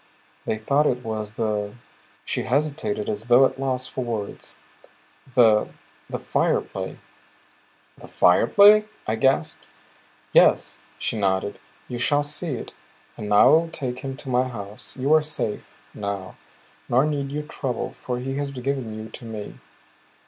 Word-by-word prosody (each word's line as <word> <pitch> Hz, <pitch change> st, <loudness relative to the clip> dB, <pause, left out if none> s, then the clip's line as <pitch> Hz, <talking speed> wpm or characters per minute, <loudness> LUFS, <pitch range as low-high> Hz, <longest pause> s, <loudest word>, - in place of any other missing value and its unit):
They 110 Hz, -, -1 dB
thought 140 Hz, +7 st, +2 dB
it 125 Hz, 0 st, -1 dB
was 110 Hz, -2 st, -4 dB
the" 105 Hz, -2 st, -2 dB, 0.5 s
she -, -, -1 dB
hesitated 130 Hz, -6 st, -1 dB
as 105 Hz, +2 st, -3 dB
though 125 Hz, +2 st, +7 dB
at 135 Hz, -, -2 dB
loss 130 Hz, -2 st, -1 dB
for 130 Hz, -, -4 dB
words 110 Hz, -4 st, -5 dB, 0.8 s
"the 110 Hz, -4 st, +5 dB, 0.4 s
the -, -, -3 dB
Fire -, -, +1 dB
Play." -, -, -6 dB, 1.0 s
"The -, -, -11 dB
Fire 90 Hz, +6 st, +4 dB
Play?" 210 Hz, +4 st, +7 dB, 0.2 s
I 110 Hz, -, -1 dB
gasped. 130 Hz, +4 st, +1 dB, 0.7 s
"Yes," -, -, +4 dB, 0.2 s
she 110 Hz, -, -2 dB
nodded. 95 Hz, 0 st, 0 dB, 0.3 s
"You 120 Hz, -1 st, -5 dB
shall 145 Hz, +4 st, +2 dB
see 145 Hz, 0 st, -2 dB
it. -, -, -8 dB, 0.4 s
And 105 Hz, -, -6 dB
now 105 Hz, -, +6 dB
I -, -, +8 dB
will 165 Hz, +1 st, +4 dB
take 130 Hz, -5 st, -4 dB
him 135 Hz, 0 st, -6 dB
to 135 Hz, -, -8 dB
my 125 Hz, +1 st, +2 dB
house. 105 Hz, -2 st, -8 dB
You 135 Hz, +4 st, +2 dB
are 155 Hz, -, +6 dB
safe 150 Hz, -8 st, -3 dB, 0.3 s
now, 100 Hz, -3 st, -5 dB, 0.5 s
nor 130 Hz, +4 st, +4 dB
need 140 Hz, -2 st, -2 dB
you 150 Hz, +1 st, -3 dB
trouble. 130 Hz, -5 st, -4 dB
For 125 Hz, -1 st, -4 dB
he 135 Hz, +2 st, -4 dB
has 145 Hz, -1 st, -2 dB
given 135 Hz, -3 st, -3 dB
you 110 Hz, 0 st, -7 dB
to 120 Hz, -, -10 dB
me." 110 Hz, -2 st, -7 dB
125 Hz, 155 wpm, -24 LUFS, 110-140 Hz, 1.0 s, I